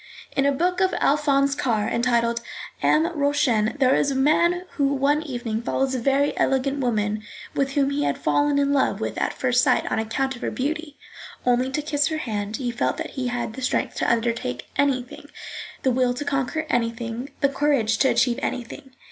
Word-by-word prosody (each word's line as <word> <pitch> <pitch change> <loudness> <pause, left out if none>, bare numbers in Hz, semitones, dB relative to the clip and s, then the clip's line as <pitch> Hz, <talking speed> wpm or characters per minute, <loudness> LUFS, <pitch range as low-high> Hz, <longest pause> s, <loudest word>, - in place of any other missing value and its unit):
In 275 0 +3
a - - +4
book 360 +6 0
of 375 0 +2
Alphonse 280 -1 +2
Karr 225 -7 0
entitled 235 -1 +1 0.4
Am 310 +1 +3
Rauchen, 280 -6 +1
there 265 -2 +4
is 285 - +2
a 275 - -2
man 340 +6 +3
who 280 -2 +1
one 285 +3 +2
evening 240 -7 -3
follows 265 +2 -1
a 255 - -1
very 275 +3 +1
elegant 270 +1 +1
woman, 215 -4 0 0.3
with 275 -1 0
whom 275 -1 +2
he 290 +1 0
had - - 0
fallen 290 0 +1
in 280 0 +2
love 275 - +1
with - - -3
at - - 0
first 250 -1 +1
sight - - +3
on - - +1
account 260 +5 -1
of 240 - -12
her - - -1
beauty. 295 +2 -3 0.5
Only 250 +1 +2
to 295 +2 -2
kiss 290 -1 +1
her 315 - -2
hand 215 -6 -3
he 245 -3 -2
felt 235 - -1
that - - -5
he 260 -2 -3
had 240 -2 -3
the 265 - -8
strength 250 - 0
to - - +1
undertake 230 - -2
anything, 260 -3 -1 0.5
the 260 - +3
will 250 0 +1
to 290 - -4
conquer 280 +3 -1
anything, 235 +1 -2
the 280 - +4
courage 270 -6 +1
to 265 - +4
achieve 245 0 +2
anything. 255 +1 -5
265 Hz, 195 wpm, -24 LUFS, 240-285 Hz, 0.5 s, a